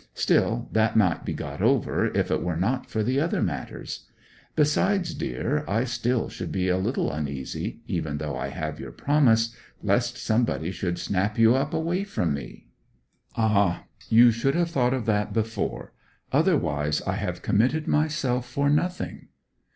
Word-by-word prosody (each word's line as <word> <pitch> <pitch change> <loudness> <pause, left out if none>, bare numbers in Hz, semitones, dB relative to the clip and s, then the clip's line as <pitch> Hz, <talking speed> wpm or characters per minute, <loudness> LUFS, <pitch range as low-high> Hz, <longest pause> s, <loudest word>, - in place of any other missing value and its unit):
Still, - - +1
that 110 0 +2
might 90 -7 +3
be - - -2
got - - -6
over - - +2
if - - +1
it - - +1
were 90 -2 -1
not 110 +10 -1
for 110 - -1
the 130 +5 +1
other 165 +4 0
matters. - - -5 0.5
Besides, 175 +5 +2
dear, 150 +4 -2
I 110 +4 +1
still 120 -1 0
should - - -6
be 95 -1 0
a 90 - +2
little 110 +8 0
uneasy, 70 -3 -4
even 75 -2 -2
though 75 0 -3
I - - -3
have - - -5
your - - -7
promise, 115 -6 +2 0.3
lest 120 +4 +1
somebody 110 -7 0
should 90 -2 -3
snap 100 +3 -1
you 115 +1 +6
up 135 +3 0
away 170 +4 -1
from 90 - -1
me.' 70 - -8 0.7
'Ah, 100 -5 +2 0.3
you 120 +1 +7
should 120 +6 0
have 170 -1 +1
thought 125 -3 +2
of 125 - -3
that 105 -2 0
before. 110 -2 -2 0.4
Otherwise 75 +1 +1
I - - -1
have - - -4
committed 130 +9 +2
myself 135 -5 0
for 140 +3 +1
nothing.' 180 +5 -1
115 Hz, 160 wpm, -26 LUFS, 100-140 Hz, 0.7 s, you